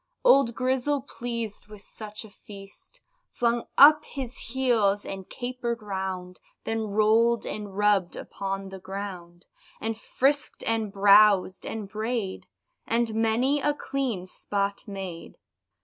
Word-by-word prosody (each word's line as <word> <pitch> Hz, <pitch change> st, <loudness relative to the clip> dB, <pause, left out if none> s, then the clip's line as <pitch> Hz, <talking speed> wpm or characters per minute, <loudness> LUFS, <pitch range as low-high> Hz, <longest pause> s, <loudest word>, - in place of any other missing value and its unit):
Old 275 Hz, -, +5 dB
Grizzle, 260 Hz, +2 st, 0 dB
pleased 235 Hz, -6 st, -6 dB
with 210 Hz, -1 st, -12 dB
such 215 Hz, 0 st, -8 dB
a 215 Hz, -, -14 dB
feast, 200 Hz, -, -13 dB, 0.3 s
Flung 235 Hz, 0 st, 0 dB
up 300 Hz, +2 st, +8 dB
his 260 Hz, -3 st, -6 dB, 0.2 s
heels, 220 Hz, -6 st, +2 dB
and 190 Hz, -1 st, -7 dB
caper'd 245 Hz, -2 st, -4 dB
round, 190 Hz, -2 st, -5 dB, 0.2 s
Then 225 Hz, -1 st, -2 dB
roll'd 220 Hz, +3 st, +3 dB
and 205 Hz, -2 st, -6 dB
rubb'd 205 Hz, -4 st, +2 dB
upon 195 Hz, 0 st, -5 dB
the 190 Hz, 0 st, -9 dB
ground, 185 Hz, -2 st, -7 dB, 0.3 s
And 225 Hz, 0 st, -2 dB
frisk'd 275 Hz, +6 st, 0 dB
and 225 Hz, -2 st, -1 dB
browsed 200 Hz, -1 st, +5 dB
and 220 Hz, -2 st, -5 dB
bray'd, 215 Hz, -1 st, -3 dB, 0.4 s
And 230 Hz, -1 st, +1 dB
many 230 Hz, +6 st, +1 dB
a 295 Hz, +1 st, +1 dB
clean 260 Hz, -10 st, -3 dB
spot 200 Hz, +1 st, -3 dB
made. 190 Hz, -4 st, -7 dB
215 Hz, 125 wpm, -26 LUFS, 195-240 Hz, 0.4 s, up